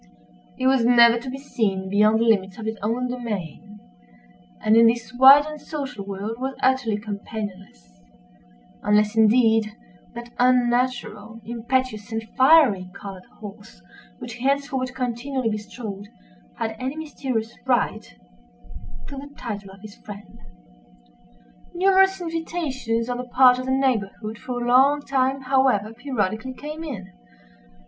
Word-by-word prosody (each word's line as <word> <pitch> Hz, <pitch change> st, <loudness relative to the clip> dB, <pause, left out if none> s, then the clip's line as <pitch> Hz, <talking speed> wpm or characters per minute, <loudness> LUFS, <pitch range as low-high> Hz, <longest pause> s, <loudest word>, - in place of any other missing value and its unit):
He 255 Hz, -, -3 dB
was 260 Hz, -2 st, +3 dB
never 235 Hz, 0 st, +6 dB
to 255 Hz, -, -7 dB
be 265 Hz, -, -5 dB
seen 205 Hz, -8 st, -2 dB
beyond 210 Hz, +3 st, +3 dB
the -, -, +2 dB
limits 200 Hz, -4 st, +1 dB
of 220 Hz, -, -7 dB
his 220 Hz, 0 st, -4 dB
own 235 Hz, +4 st, -1 dB
domain, 210 Hz, -5 st, -6 dB, 0.8 s
and, 215 Hz, -, +3 dB
in 230 Hz, 0 st, +7 dB
this 235 Hz, +1 st, -1 dB
wide 270 Hz, +3 st, +8 dB
and 305 Hz, -1 st, -8 dB
social 275 Hz, -9 st, -6 dB
world, 200 Hz, +3 st, -5 dB
was 265 Hz, +1 st, -3 dB
utterly 255 Hz, -5 st, +2 dB
companionless—unless, -, -, -5 dB
indeed, 220 Hz, -1 st, +3 dB, 0.4 s
that 235 Hz, 0 st, -8 dB
unnatural, 240 Hz, -3 st, 0 dB
impetuous, 235 Hz, -2 st, -2 dB
and 225 Hz, 0 st, -3 dB
fiery 260 Hz, -, +5 dB
colored 195 Hz, -2 st, -9 dB
horse, 195 Hz, -, -11 dB, 0.4 s
which -, -, -8 dB
he 245 Hz, +2 st, -9 dB
henceforward 270 Hz, -2 st, -1 dB
continually 250 Hz, 0 st, -2 dB
bestrode, 210 Hz, -1 st, -7 dB, 0.5 s
had 220 Hz, 0 st, -3 dB
any 260 Hz, +3 st, -3 dB
mysterious 260 Hz, -7 st, -4 dB
right 245 Hz, -, -1 dB, 0.9 s
to 280 Hz, -, -8 dB
the 285 Hz, +1 st, -8 dB
title 205 Hz, -5 st, -6 dB
of 190 Hz, 0 st, -15 dB
his 210 Hz, -1 st, -12 dB
friend. 205 Hz, 0 st, -12 dB, 1.4 s
Numerous 385 Hz, +1 st, +3 dB
invitations 315 Hz, -9 st, -3 dB
on 245 Hz, 0 st, -3 dB
the 250 Hz, -, -4 dB
part 250 Hz, 0 st, +5 dB
of 255 Hz, -, -5 dB
the -, -, 0 dB
neighborhood 230 Hz, -4 st, -1 dB
for 250 Hz, -1 st, -5 dB
a -, -, -3 dB
long 275 Hz, +4 st, +4 dB
time, 270 Hz, 0 st, 0 dB
however, 255 Hz, -5 st, +1 dB
periodically 245 Hz, -1 st, -3 dB
came 305 Hz, +4 st, -7 dB
in. 200 Hz, -12 st, -7 dB
235 Hz, 135 wpm, -23 LUFS, 210-260 Hz, 1.4 s, wide